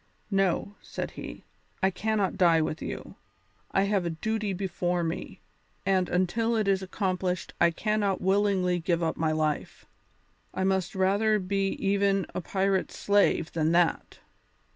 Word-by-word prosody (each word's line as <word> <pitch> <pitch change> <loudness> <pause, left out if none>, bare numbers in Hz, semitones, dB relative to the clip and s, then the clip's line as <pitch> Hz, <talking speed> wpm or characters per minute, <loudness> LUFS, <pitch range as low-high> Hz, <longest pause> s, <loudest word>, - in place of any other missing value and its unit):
"No," 195 0 +1
said - - -5
he, - - -8 0.4
"I 190 - +4
cannot 210 0 0
die 170 -3 +4
with 155 0 -2
you; - - -6 0.5
I 195 - +2
have 200 -2 +1
a 170 - -1
duty 215 +5 -2
before 180 -2 -1
me, 165 +1 -4 0.4
and 190 -2 +2
until 220 +6 +1
it 215 -2 +1
is 195 -1 +2
accomplished 185 -2 -2
I - - +6
cannot 205 +2 0
willingly 190 -2 +2
give 170 0 0
up 160 - 0
my 160 -1 0
life. 155 -1 -2 0.7
I 190 - 0
must 190 -1 0
rather 200 +3 +3
be 195 0 0
even 195 -1 +1
a - - -3
pirate's 190 +1 0
slave 200 -5 +2
than 160 0 +1
that. 175 -1 +1
190 Hz, 145 wpm, -28 LUFS, 175-200 Hz, 0.7 s, I